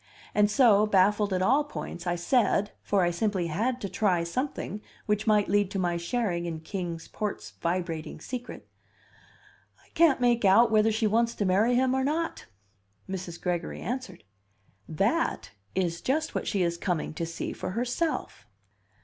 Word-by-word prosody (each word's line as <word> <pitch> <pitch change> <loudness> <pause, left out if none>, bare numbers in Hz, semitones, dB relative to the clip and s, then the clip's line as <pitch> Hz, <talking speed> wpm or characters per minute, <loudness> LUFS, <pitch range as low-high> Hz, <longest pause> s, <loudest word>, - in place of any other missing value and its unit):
And 210 0 +4
so, 215 -3 +5
baffled 205 +1 +3
at 185 0 +1
all 270 +9 +4
points, 180 -11 -7
I 175 - +1
said 205 +2 +2
(for 200 -2 +1
I 175 - +2
simply 190 0 0
had 225 +10 -1
to 200 - -2
try 185 -4 +1
something 210 +2 -3 0.2
which 210 0 0
might 210 -2 +4
lead 205 -1 +2
to 195 - -4
my 175 -2 0
sharing 175 -1 -1
in 160 -2 -5
Kings 170 -2 -5
Port's 200 - -4
vibrating 170 -3 -2
secret): 245 +8 -7 1.1
"I - - -27
can't 325 -5 +4
make 240 -2 +2
out 220 +4 +6
whether 220 0 +4
she 220 +1 0
wants 230 +2 +2
to 205 - -1
marry 210 +6 +3
him 260 +1 +2
or 265 0 +1
not." 320 +4 -2 0.6
Mrs. 185 -3 -6
Gregory 175 -2 -2
answered. 245 -8 -5 0.7
"That 200 - 0 0.2
is 170 -3 -1
just 310 +4 -1
what - - -3
she 195 -4 +1
is 170 0 -1
coming 175 -5 -2
to 165 - -3
see 170 - -4
for - - -5
herself." 250 - -2
205 Hz, 165 wpm, -28 LUFS, 175-240 Hz, 1.1 s, out